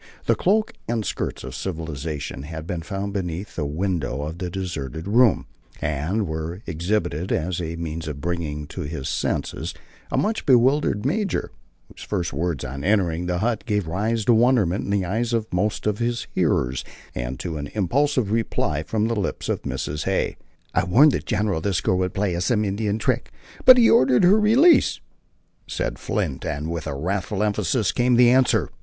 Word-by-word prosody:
The - - +4
cloak 215 +4 +1
and 115 -2 -1
skirts - - -3
of - - -7
civilization 80 -5 -4
had 80 +2 -7
been 85 -1 -3
found 100 +3 -4
beneath 90 0 -4
the 75 -3 -2
window 80 -3 -2
of 80 +3 -6
the 90 - -3
deserted 85 -4 -5
room, 115 0 +4 0.3
and 75 +9 -1
were 80 +4 -5
exhibited 85 0 -1
as 85 +2 -1
a 80 0 -4
means 80 -1 -5
of 75 -2 -5
bringing 75 -2 -3
to - - -6
his 75 -2 -4
senses - - -2 0.4
a - - 0
much 220 +2 0
bewildered 130 -3 +3
major, 195 +6 -1 0.4
whose - - -15
first 90 -8 -2
words 80 -1 -2
on 70 +2 -6
entering 90 -3 +1
the 90 0 0
hut 110 +3 0
gave 105 -4 0
rise 105 +6 -1
to 120 - +5
wonderment 110 -6 +3
in - - -6
the 100 -2 +1
eyes 115 +6 -1
of 115 -2 +1
most 100 +4 0
of 105 -1 0
his 120 0 -1
hearers, 65 +1 +1 0.3
and - - -4
to 80 0 -4
an 70 -1 -4
impulsive 125 - +1
reply 110 -8 0
from 110 +6 -1
the 115 - -1
lips 100 -3 -3
of - - -1
Mrs. 75 +1 -3
Hay. 95 0 0 0.4
"I - - +2
warned 135 - +6
the - - 0
general 105 -6 -1
that 95 -1 0
girl 90 - +2
would 90 -1 -1
play 95 -3 0
us 85 +2 -1
some 110 -3 +2
Indian 105 +1 -1
trick, 110 - -1 0.3
but 255 0 +10
he 235 -2 +6
ordered 130 +2 +5
her 195 +5 +6
release," 260 +10 +5 0.7
said - - -3
Flint, 65 - -2
and 75 +3 -3
with 85 -2 -4
wrathful 95 +8 -2
emphasis 105 +1 +1
came 125 0 +2
the 120 0 +6
answer. 130 0 +3
95 Hz, 180 wpm, -23 LUFS, 80-115 Hz, 0.7 s, but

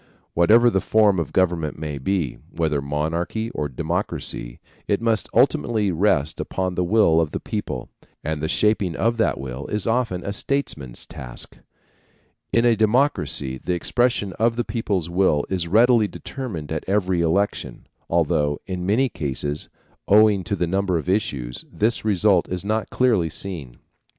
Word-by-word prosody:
Whatever 115 +8 +5
the 95 - +1
form 105 -4 +3
of 80 - -3
government 85 -5 0
may 75 -2 -5
be, 85 -2 -1
whether 75 -4 -1
monarchy 80 +10 -2
or 75 -1 -3
democracy, - - -3 0.3
it 100 - +1
must 115 -1 0
ultimately 120 -5 +2
rest 80 -5 +1
upon 95 -1 -2
the 90 - 0
will 85 -4 +4
of 80 - -1
the - - -4
people, - - -4 0.4
and 80 -1 -2
the 80 - -1
shaping 100 -1 +1
of 115 +1 +1
that 110 - +1
will 65 +1 -6
is 105 -2 -2
often 115 -6 0
a 100 - -2
statesman's 75 - -3
task. - - -7 1.0
In 115 +1 +3
a 120 -1 +5
democracy 110 - +1
the 90 - 0
expression 105 +1 0
of 115 +1 +2
the 120 - -1
people's 100 -7 -2
will 85 -4 +2
is 90 -3 -1
readily 115 +3 +5
determined 100 - -6
at 80 - -2
every 95 -3 +1
election, 95 +5 -1 0.2
although 75 -3 +1
in 90 -1 -4
many 120 +7 +3
cases, 75 - -3 0.4
owing 105 -2 +5
to 100 - -1
the 90 - 0
number 95 0 0
of 80 - -5
issues, 70 - -1
this 110 +3 0
result 100 -3 +2
is 90 +1 -3
not 110 +1 -1
clearly 110 -10 +2
seen. 80 -8 -6
95 Hz, 155 wpm, -23 LUFS, 80-110 Hz, 1.0 s, Whatever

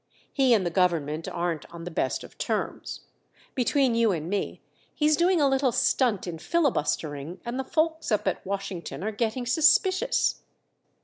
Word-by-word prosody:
He 265 -4 +4
and 195 -4 +1
the 175 - -1
government 165 -4 0
aren't 170 -3 -3
on 170 -1 -9
the 175 - -6
best 130 -5 -1
of - - -14
terms. - - -3 0.5
Between 260 0 +2
you 230 -2 +3
and 165 0 -3
me, 205 - -2 0.4
he's 300 0 +3
doing 350 +2 +3
a 285 - +4
little 270 -1 +2
stunt 235 -4 +1
in 170 -3 -6
filibustering, 165 - -1
and 240 +2 -3
the - - -1
folks 320 0 -1
up 210 - +1
at - - -1
Washington 195 -2 -5
are 215 - -1
getting 230 +3 -2
suspicious." 375 - +3
220 Hz, 165 wpm, -26 LUFS, 175-275 Hz, 0.5 s, He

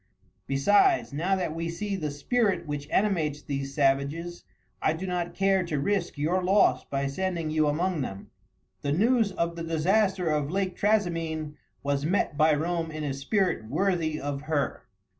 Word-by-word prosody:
Besides, 205 - +3
now 175 +7 +1
that 180 -4 -2
we 165 +1 -3
see 200 +4 -3
the 155 -5 -2
spirit 185 - 0
which 145 -1 -5
animates 165 -8 +1
these 140 -1 -4
savages, 145 +5 0 0.4
I 155 - +2
do 165 +4 -5
not 175 -2 -2
care 195 -1 +2
to 155 -4 -2
risk 180 +1 -1
your 170 +6 0
loss 195 +3 +4
by 140 0 -2
sending 165 +2 -2
you 155 -1 +2
among 165 +2 0
them." 95 -6 -6 0.5
The 140 0 0
news 225 +4 +3
of 170 -2 -1
the 165 - -5
disaster 185 +3 +1
of 150 -2 0
Lake 185 0 -1
Trasimene 165 -8 0 0.3
was 140 0 0
met 165 -1 0
by 155 0 +4
Rome 165 +2 -1
in 155 -1 -5
a 140 -2 -1
spirit 140 - 0
worthy 165 0 0
of 140 0 -3
her. 150 -2 -2
165 Hz, 165 wpm, -27 LUFS, 145-190 Hz, 0.5 s, loss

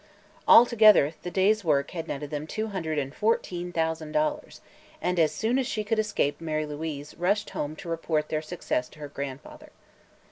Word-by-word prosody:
Altogether, 215 - +7
the 180 - -5
day's 200 +4 +2
work 140 -4 +1
had 165 -2 -5
netted 145 -1 -5
them 150 +1 -4
two 220 +6 -3
hundred 165 -6 -3
and 135 -1 -2
fourteen 180 -5 -1
thousand 160 -2 -2
dollars, 300 -1 -1 0.4
and 180 0 -1
as 155 -2 +4
soon 220 +11 0
as 260 - -1
she 215 0 -2
could 220 +1 0
escape 165 -9 0
Mary 155 -1 -2
Louise 150 -1 -6
rushed 200 +4 0
home 150 +1 -4
to 165 - -10
report 160 -2 -1
their 155 - -1
success 155 -6 -3
to - - -18
her 150 -1 -7
grandfather. 145 - -8
165 Hz, 180 wpm, -27 LUFS, 150-210 Hz, 0.4 s, Altogether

